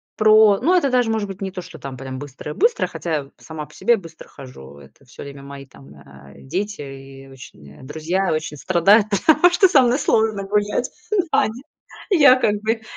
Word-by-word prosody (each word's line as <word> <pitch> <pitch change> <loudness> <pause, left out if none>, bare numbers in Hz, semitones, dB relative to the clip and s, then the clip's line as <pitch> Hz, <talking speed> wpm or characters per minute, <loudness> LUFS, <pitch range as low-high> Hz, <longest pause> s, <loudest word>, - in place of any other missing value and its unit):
про, 215 -1 +5
ну, 355 - +3
это 310 -7 +2
даже 245 -3 +1
может 220 -2 -2
быть 195 +1 -10
не 190 -1 -4
то, 185 - -7
что - - -12
там 135 -1 -8
прям 130 0 -8
быстрая-быстрая. 150 - -2
Хотя 150 -5 -4
сама 155 -2 -9
по 150 - -20
себе 235 - +2
я - - -7
быстро 165 -3 -14
хожу, 70 - -13
это 70 - -19
всё 125 - -14
время 140 -1 -10
мои 140 0 -11
там, 70 - -17
а, 70 -1 -17
дети 195 +7 -5
и, 135 -1 -11
э, - - -16
очень 75 - -14
друзья 160 +7 -2
очень 155 -1 -4
страдают, 185 +7 +3
потому 315 - +4
что 380 +2 +5
со 295 -8 +4
мной 245 +3 +1
сложно 220 -6 0
гулять. 205 +4 -1 0.4
Да, - - +3
они 225 +4 -5 0.5
я 295 -10 +6
как 215 -5 0
бы, 225 +1 -1
175 Hz, 200 wpm, -20 LUFS, 135-220 Hz, 0.5 s, я